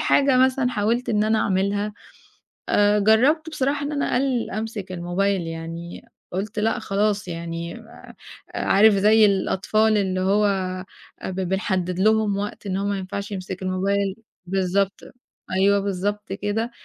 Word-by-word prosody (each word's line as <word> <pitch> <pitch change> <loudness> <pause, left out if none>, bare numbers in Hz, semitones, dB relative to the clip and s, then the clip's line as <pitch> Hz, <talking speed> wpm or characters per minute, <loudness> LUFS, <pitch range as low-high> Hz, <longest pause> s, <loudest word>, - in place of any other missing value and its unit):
حاجة 275 -3 +3
مثلًا 260 0 +3
حاولت 230 +3 0
إن 210 -1 +2
أنا 220 0 +2
أعملها، 200 +2 0 0.8
آآ، 205 0 +4
جرّبت 265 +10 +3
بصراحة 285 0 -1
إن 300 - -4
أنا 285 - -1
أقلِّل 255 -2 0
أمسك 215 -2 -5
الموبايل 180 +2 0
يعني، 165 +1 -7 0.3
قُلت 200 +3 -4
لأ 225 +3 +1
خلاص 205 -1 0
يعني 170 +2 -5
آآ، 220 - -14 0.4
عارف 210 +2 +4
زي 210 +2 +5
الأطفال 215 +2 +1
اللي 185 -2 0
هو 205 +2 +3
آآ، 185 -1 -2 0.4
ب 190 +1 -4
بنحدِّد 185 -1 -1
لهم 215 -1 +3
وقت 205 0 -5
إن 190 -1 -1
هو 200 +1 -1
ما 200 -1 -1
ينفعش 200 +2 -5
يمسك 190 -1 -6
الموبايل 195 +1 0 0.3
بالضبط، 195 +1 0 0.5
أيوه، 200 +2 +3
بالضبط 200 +1 -3
كده، 205 +4 -2
200 Hz, 140 wpm, -23 LUFS, 190-220 Hz, 0.8 s, زي